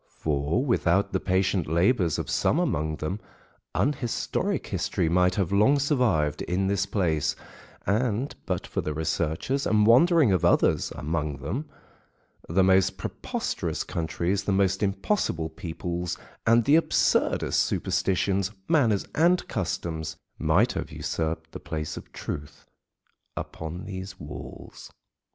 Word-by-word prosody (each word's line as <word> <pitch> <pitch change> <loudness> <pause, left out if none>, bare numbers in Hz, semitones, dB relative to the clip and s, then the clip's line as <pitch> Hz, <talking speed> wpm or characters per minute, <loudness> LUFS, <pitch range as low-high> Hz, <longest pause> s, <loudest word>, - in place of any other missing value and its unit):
For 75 - 0
without 100 -5 +2
the - - +2
patient 95 0 +1
labours 85 - +2
of - - -3
some - - +1
among 75 +1 0
them 80 +7 -3 0.6
unhistoric 130 -4 -1
history - - -1
might 90 +1 +3
have 95 -4 0
long 105 +8 +4
survived 125 - +1
in 95 +2 -1
this 100 0 0
place, 80 -7 0 0.5
and 115 +5 0
but - - -2
for - - -2
the 75 - -3
researches 80 - -1
and 105 -1 +4
wandering 145 - +6
of 90 -4 +1
others - - +3
among 75 -2 -2
them, 150 +4 -4 0.8
the 95 +3 +3
most 95 0 +3
preposterous - - -3
countries, 85 +4 -2
the - - +1
most 95 -1 +2
impossible 95 - 0
peoples, 85 +2 -4 0.3
and 115 0 +5
the 150 +3 +6
absurdest 165 - +2
superstitions, 95 0 +1 0.2
manners, 120 - +3
and 175 +3 +3
customs, 80 -6 -3 0.2
might - - +3
have - - -4
usurped 80 0 -3
the - - -7
place 75 -1 -4
of - - -10
truth 70 0 -7 0.7
upon 80 +3 -6
these 95 -1 -7
walls. 75 0 -9
95 Hz, 130 wpm, -26 LUFS, 80-110 Hz, 0.8 s, wandering